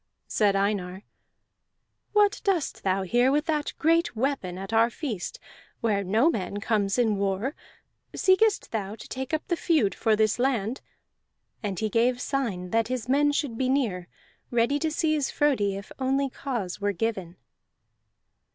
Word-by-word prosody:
Said 205 -2 +2
Einar: 195 -1 -1 1.1
"What 415 -1 +3
dost 385 -8 0
thou 190 0 0
here 245 +7 +3
with 295 +2 +1
that 305 -3 -1
great 330 -2 +2
weapon 225 -7 -1
at 195 +3 -6
our 225 +1 +5
feast, 235 - -5 0.4
where 205 -3 +1
no 215 - +3
man 205 - -3
comes 205 -1 0
in 220 -4 +2
war? 200 +7 -1 0.6
Seekest 400 +3 +3
thou 210 -2 -3
to - - -11
take 265 +2 -5
up 315 -1 -2
the 345 - +1
feud 315 - +2
for 220 -2 +2
this 215 +1 +1
land?" 245 -2 0 0.8
And 200 -4 -3
he 215 - 0
gave 240 +3 +2
sign 220 -11 -2
that 225 0 +2
his 250 -2 -3
men 290 +3 +3
should 280 -5 -2
be 260 -1 +1
near, 215 -10 0 0.4
ready 240 +4 +2
to 315 +1 0
seize 310 -2 0
Frodi 245 -10 +1
if 200 - -10
only 270 +1 +1
cause 235 -11 -4
were 205 0 +1
given. 190 -4 -3
230 Hz, 155 wpm, -26 LUFS, 200-280 Hz, 1.1 s, our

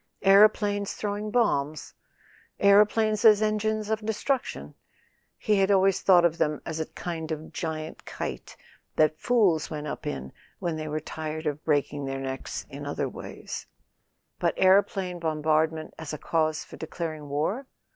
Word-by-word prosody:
Aeroplanes 205 0 +4
throwing 210 0 -3
bombs? 155 - 0 0.7
Aeroplanes 210 +2 +4
as 215 -2 +7
engines 215 0 0
of 220 0 -1
destruction? 220 +5 -2 0.6
He 210 -2 +1
had 195 0 +3
always 195 -1 +3
thought 180 -3 +6
of 170 0 +1
them 150 -1 +1
as 160 -1 -4
a 160 - -2
kind 165 -2 -5
of 155 0 -5
giant 160 -1 -5
kite - - -6 0.4
that 155 0 +3
fools 205 -10 +2
went 150 -1 -5
up 150 - -5
in 65 - -5 0.2
when 170 -2 -2
they 155 0 -5
were 155 0 -2
tired 155 +1 -5
of 150 0 -2
breaking 145 -2 0
their 135 0 -3
necks 135 -1 -5
in - - -8
other - - -2
ways. - - -8 0.7
But - - 0
aero¬ 190 +2 +6
plane 180 -3 -4
bombardment 155 0 0
as 160 -1 -6
a - - -3
cause 155 0 0
for - - -12
declaring 155 -2 -5
war 190 - -1
165 Hz, 155 wpm, -27 LUFS, 155-205 Hz, 0.7 s, as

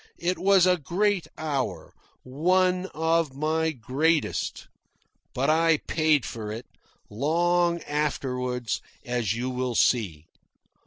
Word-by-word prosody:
It 180 +2 -1
was 195 -2 +5
a 180 0 +4
great 185 +5 0
hour 145 -4 -3 0.3
one 180 +7 +1
of 160 -3 0
my 160 +2 0
greatest. 150 +5 -1 0.7
But 135 +2 0
I 165 0 +4
paid 155 -4 +2
for 110 -2 -6
it, 115 +3 -6 0.4
long 170 +7 +1
afterwards, 125 -5 -2 0.2
as 120 -5 -1
you 125 +3 -3
will 125 -1 -2
see. 95 -12 +1
150 Hz, 110 wpm, -26 LUFS, 125-170 Hz, 0.7 s, was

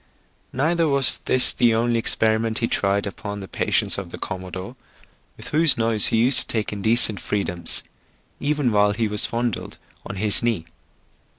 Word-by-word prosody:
Neither 165 +5 -1
was 140 -3 +4
this 130 - +3
the 120 -3 +1
only 115 0 0
experiment 110 0 0
he 115 - -1
tried 100 -1 -1
upon 100 +1 -7
the 95 - -9
patience - - -1
of 95 -3 -9
the - - -9
commodore, 95 +3 -8 0.6
with - - -8
whose 155 -3 +2
nose 115 -2 0
he - - -1
used 120 +4 +6
to - - +4
take 110 -2 -2
indecent 110 0 +2
freedoms, 90 -5 -2 0.6
even. 145 -3 -1
while 105 -1 +2
he 110 +1 -2
was 105 0 +1
fondled 120 -2 -4 0.3
on - - -8
his 105 +1 +5
knee. 115 -9 -2
110 Hz, 165 wpm, -21 LUFS, 100-120 Hz, 0.6 s, used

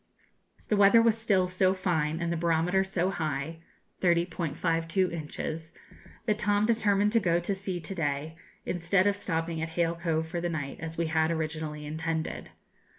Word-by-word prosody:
The 215 - +3
weather 205 +2 +7
was 230 -1 +4
still 205 -5 +2
so 185 +1 +2
fine, 165 -4 0
and 170 0 -1
the - - -1
barometer 170 +3 +2
so 190 -1 -1
high 155 -2 -3 0.4
30.52 170 0 +1
inches 160 0 -5 0.5
that 215 -2 +1
Tom 205 +1 +2
determined 210 -2 +3
to 230 - +4
go 170 -4 +2
to 175 +3 -1
sea 190 -2 -4
to 160 +5 -3
day, 155 -2 -2 0.3
instead 180 +2 +1
of 205 0 +3
stopping 165 -4 -2
at 160 - -2
Hale 165 0 0
Cove 165 -2 -1
for 170 +1 -3
the 175 - -1
night, 145 -4 -4
as 165 0 -6
we 170 - +1
had 160 0 +2
originally 155 -2 -3
intended. 160 +1 -3
170 Hz, 165 wpm, -29 LUFS, 160-190 Hz, 0.5 s, weather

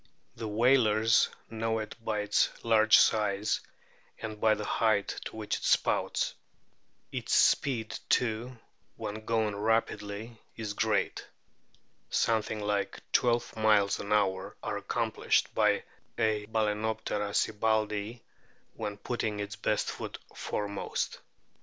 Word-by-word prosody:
The 110 - -5
whalers 110 -1 +4 0.2
know 115 0 -1
it 110 -1 -4
by 105 -2 -1
its 105 0 +2 0.2
large 110 -1 +6
size 105 -1 +2 0.6
and 110 -1 -7
by 110 -1 +5
the 105 0 -5
height 110 -2 +2 0.2
to - - -7
which 110 -1 -2
it - - -11
spouts. - - +1 0.8
Its - - -1
speed 115 -5 +2
too, 120 +1 0 0.4
when 110 +1 -6
going 110 -3 +1
rapidly, 110 +1 -1 0.2
is 110 -2 -4
great. - - 0 0.8
Something 110 -1 +1
like 105 -1 -1
twelve 120 -1 +2
miles 105 -2 +3
an 100 - -6
hour 95 -2 +1
are - - -2
accomplished - - 0
by - - +3 0.3
a 110 -2 +1
Balcenoptera 110 -1 -1
sibbaldii 110 +1 0 0.5
when 105 -2 -5
putting 110 -2 -3
its 100 +1 -4
best 105 -2 0
foot - - -6 0.2
foremost. 100 -1 -3
110 Hz, 115 wpm, -30 LUFS, 105-110 Hz, 0.8 s, large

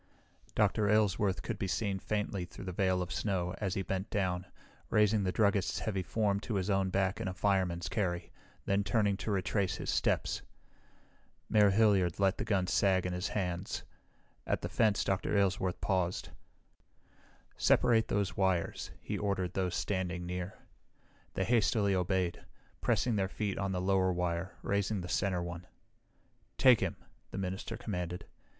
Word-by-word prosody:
Dr. 105 0 +2
Aylesworth 105 -2 +2
could 115 -4 -4
be 95 - -1
seen 100 0 -1
faintly 105 -2 -2
through 90 - -10
the 90 - -3
veil 95 0 +1
of 90 - -7
snow 90 -4 -1
as 100 -2 -1
he 95 - -1
bent 95 +2 -3
down, 90 -2 -1 0.4
raising 105 0 +3
the 95 - +1
druggist's 100 -1 +2
heavy 100 -4 -1
form 100 +1 0
to 105 +1 -4
his 95 +1 0
own 95 -1 +2
back 95 +3 0
in 110 - -2
a 90 - -4
fireman's 90 -5 +1
carry, 85 -2 -2 0.3
then 100 +1 +2
turning 100 0 +2
to 110 - -4
retrace 100 0 0
his - - -3
steps. - - +1 1.1
Mayor 105 -1 +6
Hilliard 100 -4 +3
let 95 -1 +2
the - - 0
gun 95 -3 +1
sag 95 0 +2
in 90 - -1
his 90 +3 -2
hands. 95 -3 -3 0.6
At - - 0
the - - -3
fence 110 -3 +2
Dr. 95 +1 0
Aylesworth 95 -2 +1
paused. 90 -2 0 1.3
"Separate 115 -2 +4
those 100 -3 0
wires," 95 -3 0
he - - -3
ordered 95 -3 -1
those 90 -2 -1
standing 90 -3 -2
near. 90 +1 -4 0.8
They 95 - +1
hastily 110 -2 +2
obeyed, 90 -1 0 0.4
pressing 120 -4 +1
their 95 -1 0
feet 100 -1 -2
on 95 -1 -1
the 90 - -1
lower 95 0 +2
wire, 90 0 -2
raising 100 0 0
the 90 - -7
center 95 -2 0
one. 85 0 -7 0.9
"Take 130 -4 +7
him!" - - -1 0.3
the - - -7
minister 95 +4 -3
commanded. 90 -5 -4
95 Hz, 160 wpm, -32 LUFS, 90-100 Hz, 1.3 s, Take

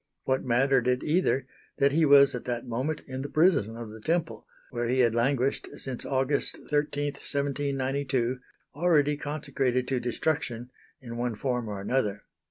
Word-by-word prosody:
What 130 0 0
mattered 130 +1 +2
it 125 0 +1
either 150 -5 +1 0.3
that 140 -1 +4
he 160 +2 +3
was 140 -1 +7
at 125 - -5
that 120 -1 -3
moment 130 +6 -2
in 130 -1 -5
the 140 - -5
prison 145 - +2
of 115 -2 -7
the 110 0 -11
Temple, 165 +5 -1 0.2
where 120 -1 -2
he 130 +2 +2
had 120 -2 +3
languished 130 +3 +1
since 135 -3 -5
August 135 +1 0
13, 145 -1 0
1792, 135 -3 -1 0.3
already 150 -2 +3
consecrated 140 -4 -1
to 130 -2 +1
destruction, 120 -1 -2 0.3
in 120 -2 -7
one 120 -1 -1
form 125 0 -2
or 105 -2 -4
another. 105 -1 -1
130 Hz, 160 wpm, -28 LUFS, 120-145 Hz, 0.3 s, was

